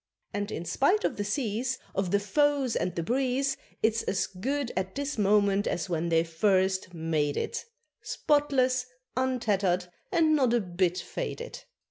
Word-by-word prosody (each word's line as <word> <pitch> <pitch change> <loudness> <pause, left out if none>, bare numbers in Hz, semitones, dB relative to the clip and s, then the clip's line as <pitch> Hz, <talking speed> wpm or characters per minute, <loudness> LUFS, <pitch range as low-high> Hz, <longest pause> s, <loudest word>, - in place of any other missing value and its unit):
And, 205 +1 -2
in 170 - -4
spite 285 - +2
of - - -1
the 205 - -1
seas, 235 +3 -1 0.2
Of 195 -2 0
the 200 - +3
foes 280 +3 +2
and 180 -1 -1
the 170 - -1
breeze, 265 +5 +1 0.3
It's 225 +1 +3
as 195 - 0
good 260 +7 -2
at 190 0 -2
this 285 -3 -3
moment 205 0 +3
as 170 +1 -2
when 170 0 0
they 165 0 +4
first 190 +2 +1
made 160 -3 -1
it, - - -2 0.4
Spotless, 260 -4 +1 0.3
untattered, 200 -9 +1 0.2
and 320 -4 +4
not 255 -5 +3
a - - +4
bit 180 -2 0
faded. - - -5
210 Hz, 155 wpm, -28 LUFS, 185-265 Hz, 0.4 s, they